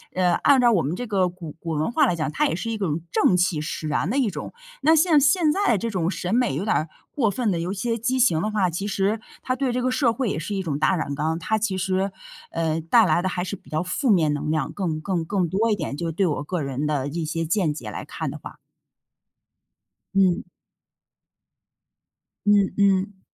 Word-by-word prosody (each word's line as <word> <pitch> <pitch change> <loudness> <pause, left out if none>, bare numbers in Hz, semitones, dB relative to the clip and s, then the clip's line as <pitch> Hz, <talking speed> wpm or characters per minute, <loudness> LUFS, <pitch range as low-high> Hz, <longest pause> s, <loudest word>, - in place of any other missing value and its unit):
呃， 180 -1 +3
按 280 +5 +4
照 240 -1 +5
我 185 -7 +3
们 150 +6 -2
这 245 - -4
个 195 -4 +1
古 175 -3 -9
古 170 - -7
文 155 +7 -1
化 - - +4
来 175 - +1
讲， 155 -2 -2
它 - - +1
也 165 - -1
是 230 +5 -4
一 220 - -2
种 165 -5 -1
正 180 - +3
气 175 -3 +1
使 155 0 -4
然 150 +3 0
的 260 - 0
一 240 -7 +2
种。 - - -7 0.3
那 320 +1 +5
像 315 -1 +5
现 300 +3 +4
在 395 - +2
这 230 +4 -3
种 175 -3 0
审 180 +1 -3
美 240 - +2
有 175 - -2
点 220 - +1
儿 155 - 0 0.2
过 235 -7 +1
分 220 +1 0
地 170 - -1
有 175 +3 -2
一 - - -4
些 230 +4 -1
畸 250 +4 0
形 225 -11 +3
的 215 - -1
话， 205 -4 +1
其 195 +5 -3
实 200 +2 0 0.2
它 255 - -1
对 260 -1 -1
这 250 +1 -1
个 255 - +1
社 245 -4 +2
会 255 -3 -1
也 - - -2
是 200 +6 -4
一 190 - -2
种 145 -4 -2
大 170 +5 +3
染 145 -4 -2
缸， 160 +3 -1
它 220 +6 0
其 205 -3 -1
实， 190 +1 0 0.4
呃， 165 -1 -1
带 215 +7 +4
来 170 0 +2
的 185 - -1
还 180 -1 -2
是 195 +2 -4
比 - - -20
较 155 +2 -1
负 205 +8 -1
面 160 -7 +4
能 150 +1 -3
量 155 0 -1
更 165 -6 -3
更 175 -2 -2
更 185 0 0
多 215 +5 +1
一 - - +3
点， 155 -6 -4
就 170 - -3
是 - - -2
对 195 +3 +1
我 145 -2 -2
个 180 0 -2
人 135 +1 -3
的 140 -3 -1
一 165 +2 -3
些 165 +1 -2
见 165 -2 +1
解 120 -7 -7
来 - - -6
看 - - -4
的 - - -7
话。 - - -10 1.6
嗯。 185 -2 +2 2.0
嗯 205 -2 +4
嗯。 195 0 +2
185 Hz, 255 characters per minute, -24 LUFS, 160-220 Hz, 2.0 s, 照